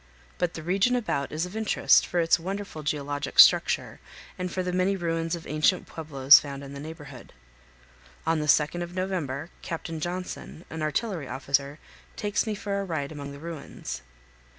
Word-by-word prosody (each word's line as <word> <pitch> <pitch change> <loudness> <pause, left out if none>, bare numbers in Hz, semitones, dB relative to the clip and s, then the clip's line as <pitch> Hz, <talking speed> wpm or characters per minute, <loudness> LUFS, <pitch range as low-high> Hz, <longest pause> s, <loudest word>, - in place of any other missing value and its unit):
But 175 -2 0
the 160 - -6
region 195 +9 +2
about 215 - -1
is 155 +3 -1
of 180 +3 -9
interest 220 -1 +4
for 175 - 0
its 165 0 +4
wonderful 195 -2 -5
geologic 145 -1 -3
structure - - +6 0.4
and 180 -1 -4
for 185 - -2
the 180 0 -2
many 185 +2 +2
ruins 165 -2 -1
of 170 - -9
ancient 155 +5 +2
pueblos 140 -4 +6
found 140 -1 -7
in 140 0 -9
the 140 - -7
neighborhood. 155 0 -10 0.9
On 165 0 +2
the 150 - -2
2d 150 +4 +3
of 175 +1 -6
November 175 -5 -3
Captain 165 -1 -5
Johnson, 155 - -5
an 160 0 -5
artillery 155 - -1
officer, 140 +3 -1 0.4
takes 205 +2 -1
me 215 - -1
for 200 -1 -2
a - - -2
ride 160 -6 -3
among 140 -2 -7
the 140 - -9
ruins. 160 - -7
165 Hz, 175 wpm, -27 LUFS, 145-185 Hz, 0.9 s, structure